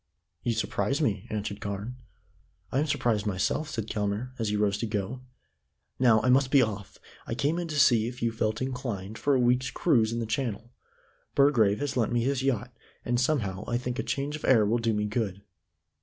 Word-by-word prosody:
"You 120 - 0
surprise 115 +3 -1
me," 105 - 0
answered 105 -1 -4
Carne. 100 +5 -5 0.7
"I 135 - +1
am 150 - +1
surprised 110 -7 0
myself," 105 +10 -1
said 115 -8 -3
Kelmare, 105 +3 -2
as 110 -2 0
he 105 - 0
rose 105 -1 +1
to 115 - -2
go. 105 +4 -3 0.8
"Now, 120 -4 +5
I 125 - +2
must 130 +1 +4
be 135 -2 +5
off. 100 -3 -5 0.3
I 115 - -2
came 145 +7 0
in 175 - -3
to 155 -2 -2
see 115 -5 +5
if 125 +1 -7
you 115 - 0
felt 110 +1 -1
inclined 115 -6 -4
for 145 -1 +2
a - - +3
week's 125 +1 +2
cruise 115 -10 +2
in 115 - -2
the 115 - -1
Channel. 115 0 -3 0.6
Burgrave 120 -6 +4
has 145 -2 -2
lent 115 -3 +1
me 120 -1 +1
his 135 +1 0
yacht, 125 -2 -1 0.3
and 120 0 +1
somehow 110 -8 0
I 120 - 0
think 125 +1 -4
a - - +2
change 140 +2 -2
of 155 - -9
air 115 -5 +5
will 115 +4 +1
do 115 0 +1
me 105 -1 0
good." 105 -3 -2
115 Hz, 205 wpm, -28 LUFS, 105-130 Hz, 0.8 s, Now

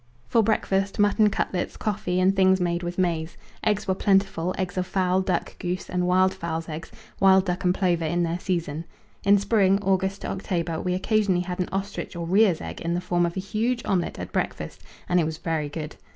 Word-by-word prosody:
For 230 - +3
breakfast, 195 -2 0
mutton 205 +1 +4
cutlets, 185 -2 -2
coffee, 185 -4 -1
and 190 +1 +3
things 190 0 +4
made 175 -1 0
with 175 0 -5
maize. 170 -3 -1 0.3
Eggs 210 -1 0
were 190 - +2
plentiful 195 -2 +1
eggs 185 -2 -2
of 185 -1 -1
fowl, 185 -1 +1
duck, 185 -2 -2
goose, 180 0 -4
and 180 0 0
wild 185 +1 +4
fowl's 165 -1 -4
eggs 155 0 -7 0.3
wild 190 0 +5
duck 180 -1 -2
and 180 - +4
plover 180 -3 +1
in 175 +2 0
their 170 +1 -1
season. 165 -4 -2 0.4
In 200 0 +6
spring 200 -1 +3
August 190 +1 0
to - - -4
October 170 -4 -2
we 180 0 -1
occasionally 195 -1 +1
had 180 0 -5
an 180 - -1
ostrich 195 0 -4
or 170 -1 -4
rhea's 190 -1 +3
egg - - -7
in 170 +1 -1
the - - 0
form 175 -1 +1
of 170 - -6
a - - -1
huge 230 +5 -1
omelette 180 -4 0
at - - -6
breakfast, - - -3 0.3
and 180 - +3
it - - +3
was 155 0 -3
very 160 -3 -2
good. 150 +1 -6
185 Hz, 210 wpm, -25 LUFS, 175-195 Hz, 0.4 s, In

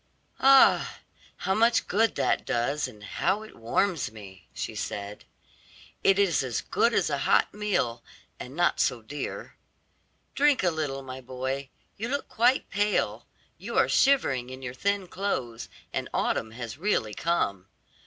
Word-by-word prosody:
"Ah, 270 0 +5 0.4
how 190 - 0
much 230 +3 +3
good 225 +3 +2
that - - +1
does, 135 +5 -1
and 105 -5 -13
how 190 - -1
it 220 - -13
warms 155 - 0
me," 95 -4 -13
she - - -5
said; 100 0 -5 0.8
"it 195 0 +5
is 195 -6 +3
as 125 -5 -2
good - - +1
as - - +1
a - - 0
hot - - +3
meal, 185 - -1 0.4
and 130 +3 -8
not 175 +1 +2
so 120 -3 +1
dear. 145 +6 -6 0.8
Drink 285 -6 +3
a 175 - +3
little, 145 -4 -3
my 130 0 -8
boy; 130 +2 -4 0.3
you 225 +3 -3
look 285 +1 -2
quite 245 +4 +2
pale; 205 +1 0 0.3
you - - -5
are - - +5
shivering 135 - +2
in 130 +1 -9
your 125 -1 -5
thin 200 +7 -1
clothes, 130 - -3 0.2
and - - -3
autumn 110 - 0
has 120 +3 -7
really 165 - 0
come. 100 - -1
140 Hz, 155 wpm, -27 LUFS, -, 0.8 s, Ah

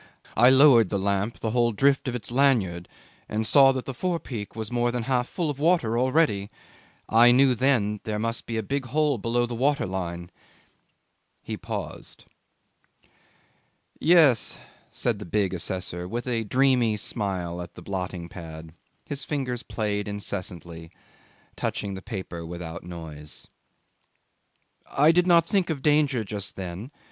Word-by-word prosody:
I 120 +2 +7
lowered 130 -6 +6
then 100 - -1
the 95 - -4
lamp 100 +3 -1
the 110 - -1
whole 120 0 +2
drift 135 +6 +2
of 125 - -2
its 120 - -3
lanyard, 115 -10 +2 0.4
and 110 +1 -1
saw 135 +4 +7
that 130 -1 -4
the 135 - -5
forepeak 130 - -4
was 110 -1 -5
more 120 0 +1
than 120 -1 -2
half 125 0 0
full 165 -5 -2
of 140 - -9
water 155 -8 +2
already. 125 -5 +2 0.6
I 120 +2 +6
knew 130 +1 +5
then 110 -5 +1
there 110 -2 -3
must 115 +2 -3
be 115 - -3
a 110 - -1
big 140 +5 -2
hole 145 0 +1
below 120 +3 0
the 120 - -6
water 140 +5 +1
line.' 85 -2 -5 1.1
He - - -4
paused. - - -7 1.7
'Yes,' 155 -8 +4 0.3
said - - -1
the - - -6
big 95 +1 0
assessor, 90 0 -4
with 120 +5 -4
a 115 -3 -1
dreamy 125 -2 +2
smile 95 -5 -3
at 85 - -10
the 90 - -11
blotting 90 -2 -4
pad; 80 -2 -10 0.3
his 140 -1 -4
fingers 130 -5 -3
played 105 -3 -3
incessantly, 90 -5 -5 0.7
touching 100 -1 -3
the 95 - -7
paper 95 -6 -6
without 85 -1 -7
noise. 80 -4 -9 1.5
'I 150 +3 +6
did 180 +2 +2
not 170 -2 +5
think 190 -1 +1
of 145 -5 -3
danger 145 -5 +3
just 100 -1 -5
then. 95 +5 -6
115 Hz, 155 wpm, -25 LUFS, 95-135 Hz, 1.7 s, I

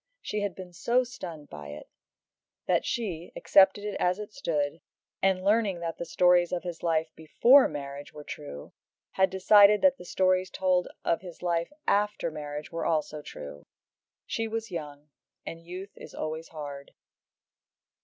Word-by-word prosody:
She 210 - -3
had 205 -3 -2
been 180 -2 -10
so 235 +8 +2
stunned 180 - -9
by 75 -1 -8
it, 75 +1 -9 0.8
that - - +2
she, 180 -8 -3
accepted 195 +1 +5
it 210 - -3
as 180 +1 +2
it 210 0 -8
stood, 155 - -2 0.4
and 190 -1 +2
learning 205 -2 +2
that 165 -1 -4
the 170 - -3
stories 175 +1 +4
of 180 - -2
his 175 -2 -6
life 160 -1 0
before 240 - +5
marriage 140 -1 -7
were 150 - -10
true, 70 - -8 0.4
had 190 0 +3
decided 205 +3 +6
that 275 -1 +5
the - - -10
stories 185 0 +2
told 185 -1 +1 0.2
of 170 - +1
his 180 -2 -11
life 170 +2 0 0.2
after 205 -4 +1
marriage 150 -1 -6
were 165 0 -4
true - - +1
also. 150 - -4 0.6
She 225 0 -2
was 225 -1 -4
young, 150 -3 -7 0.3
and 165 - -7
youth 185 +3 -8
is - - -11
always 160 +1 -4
hard. 145 -3 -8
175 Hz, 160 wpm, -28 LUFS, 155-200 Hz, 0.8 s, decided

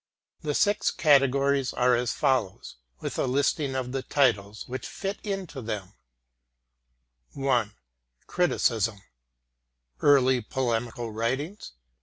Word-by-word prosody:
The 150 -2 -2
six 205 +1 +2
categories 140 -2 +3
are 125 0 +3
as 120 0 0
follows, 125 - -1 0.2
with - - -4
a - - +1
listing 140 +1 0
of 125 -1 -3
the 135 0 -2
titles 110 -8 0
which 130 +1 -5
fit 195 +1 -5
into 195 -9 -4
them: 105 -4 -5 1.4
1) 125 -6 0 0.5
Criticism: 115 - 0 1.0
Early 130 -3 +4
Polemical 120 -1 -2
Writings 130 - -3
[c. - - -44
130 Hz, 110 wpm, -27 LUFS, 115-140 Hz, 1.4 s, Early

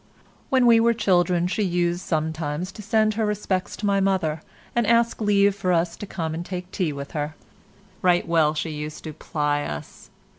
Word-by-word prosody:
When 260 -2 +4
we 230 -1 +7
were 235 0 +3
children 180 -4 +2
she 185 +4 -1
used 175 -2 0
sometimes 160 +1 -2
to 210 - -10
send 215 +1 +2
her 220 +1 0
respects 200 -3 -2
to 210 - -4
my 200 -1 +2
mother, 185 -6 0 0.3
and 235 -3 +2
ask 235 0 +2
leave 200 -1 +4
for 185 -2 -1
us 170 0 +1
to 205 - -7
come 165 -4 -3
and 165 +2 -4
take 180 0 -6
tea 175 -5 -1
with 140 -1 -7
her. 150 0 -3 0.7
Right 175 -1 +3
well 160 -2 +3
she 160 +1 -2
used 150 0 -6
to 155 - -6
ply 150 -1 -1
us. 75 - -7
180 Hz, 190 wpm, -24 LUFS, 160-205 Hz, 0.7 s, we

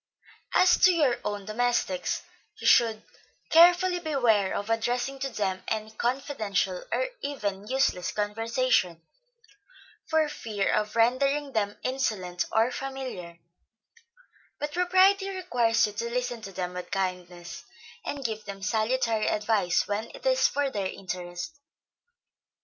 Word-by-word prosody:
As 365 0 +5
to 370 - +7
your 295 -8 +2
own 205 -1 -3
domestics, 215 -4 -1 0.4
you - - -8
should 225 -3 +4 0.5
carefully 355 +2 +6
beware 245 - +2
of 205 - -3
addressing 245 +4 -1
to 270 - -2
them 190 -5 -2
any 220 0 -2
confidential 220 -6 -1
or - - 0
even 205 -8 -3
useless 255 -8 +1
conversation, 215 -4 0 1.0
for 315 -1 +2
fear 215 -8 -2
of 210 +1 0
rendering 275 +5 +2
them 205 -4 -1
insolent 205 -9 -1
or 225 +3 +3
familiar; 255 -12 -6 1.2
but 295 0 -4
propriety 375 +2 +4
requires 245 -12 +1
you 210 - -5
to 230 +3 -3
listen 245 -1 -2
to 195 - -8
them 180 -1 -4
with 180 0 -6
kindness, 180 -3 -4 0.4
and 280 -2 -5
give 220 -1 -3
them 195 -1 -8
salutary 220 +1 +1
advice 210 -4 +1
when 210 +3 -2
it - - -13
is - - +4
for 285 -1 -1
their 200 -4 -2
interest. 180 - -6
225 Hz, 125 wpm, -27 LUFS, 200-270 Hz, 1.2 s, to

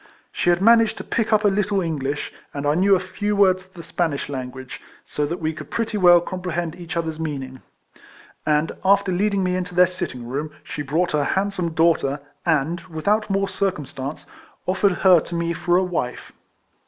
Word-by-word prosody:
She - - 0
had 175 +2 +2
managed 230 0 +5
to - - -6
pick 230 -1 -1
up 215 0 +4
a - - +7
little 200 0 +1
English, 145 -5 -3 0.2
and 140 0 -3
I 145 - +3
knew 195 +4 +4
a - - +1
few 205 +3 -2
words 185 -2 +3
of 190 - -30
the 170 -2 -10
Spanish 165 -4 -2
language, 130 -1 -6 0.2
so 150 0 -2
that 170 +4 -3
we 160 0 -1
could - - -9
pretty 230 -1 -2
well 175 -3 +7
comprehend 175 -2 -4
each 170 -1 -6
other's 160 -1 -2
meaning; 135 -5 -5 0.8
and 150 +1 +1
after 200 0 +3
leading 200 +1 +1
me 180 0 0
into 180 -1 -4
their 180 +1 +7
sitting 130 -9 -5
room, 145 +5 -3
she 150 - -5
brought 160 +6 0
her 150 -1 +1
handsome 190 -1 -1
daughter, 160 -3 +2 0.3
and, 160 +2 +1
with 160 -1 -8
out 215 +1 +2
more 195 0 +1
circumstance, 155 -7 -3 0.4
offered 190 +1 +2
her 180 -2 +8
to 170 - -6
me 170 0 -1
for 175 +1 +1
a 185 - +3
wife. 170 -9 -3
175 Hz, 190 wpm, -22 LUFS, 150-190 Hz, 0.8 s, her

